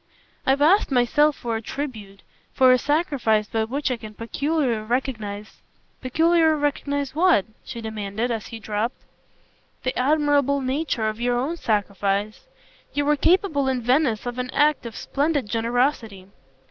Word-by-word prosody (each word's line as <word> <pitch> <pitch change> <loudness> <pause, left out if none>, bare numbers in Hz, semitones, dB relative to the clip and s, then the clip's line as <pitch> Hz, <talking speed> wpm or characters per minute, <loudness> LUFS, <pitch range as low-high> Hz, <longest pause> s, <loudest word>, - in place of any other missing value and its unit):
"I've 275 +2 +3
asked 380 +7 +4
myself 280 +4 +3
for 235 -2 -3
a 225 - -3
tribute, 220 -7 -7 0.3
for 260 -1 +5
a 255 - +5
sacrifice 275 -8 +1
by 220 +1 -1
which 270 +4 -2
I 250 - -1
can 215 -2 -10
peculiarly 255 0 -1
recognise 220 -5 -3 0.2
" - - -40
"Peculiarly 320 +3 +3
recognise 285 -1 -1
what?" 330 - +3 0.2
she 235 -3 -7
demanded 220 +1 -3
as 225 -2 -3
he 230 - -8
dropped. 220 +2 -3 0.8
"The 255 - -1
admirable 285 0 +2
nature 260 -3 -1
of 215 +2 -4
your 245 0 +1
own 275 +7 -1
sacrifice. 205 - -1 0.5
You 290 0 +1
were 295 +1 +3
capable 320 -3 +2
in 255 -2 -1
Venice 250 -3 +1
of 245 +1 -4
an 250 0 -3
act 295 -4 +2
of 230 - -9
splendid 285 -4 -1
generosity." 230 -4 -1
255 Hz, 150 wpm, -23 LUFS, 220-290 Hz, 0.8 s, for